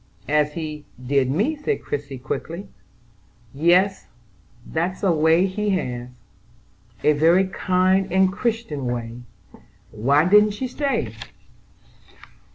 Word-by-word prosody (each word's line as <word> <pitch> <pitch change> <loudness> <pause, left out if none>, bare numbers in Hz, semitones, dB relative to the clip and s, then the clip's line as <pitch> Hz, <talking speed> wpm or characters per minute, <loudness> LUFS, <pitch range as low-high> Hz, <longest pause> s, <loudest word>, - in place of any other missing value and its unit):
"As 150 0 +1
he 155 -2 -6 0.2
did 135 0 +1
me?" 210 - 0
said 305 +9 -3
Christie 145 -2 -5
quickly. 165 +8 -5 0.9
"Yes, 180 +6 +2 0.6
that's 175 +5 -3
a 190 - +3
way 160 +3 +3
he 210 +2 -2
has." 125 -3 -5 0.9
"A 150 - +5
very 165 +6 +4
kind 185 0 +1
and 190 0 +3
Christian 215 - -2
way. 120 0 -4 0.7
Why 140 +8 +2
didn't 210 +1 +5
she 260 - -3
stay?" 280 +2 -2
170 Hz, 110 wpm, -22 LUFS, 145-195 Hz, 0.9 s, A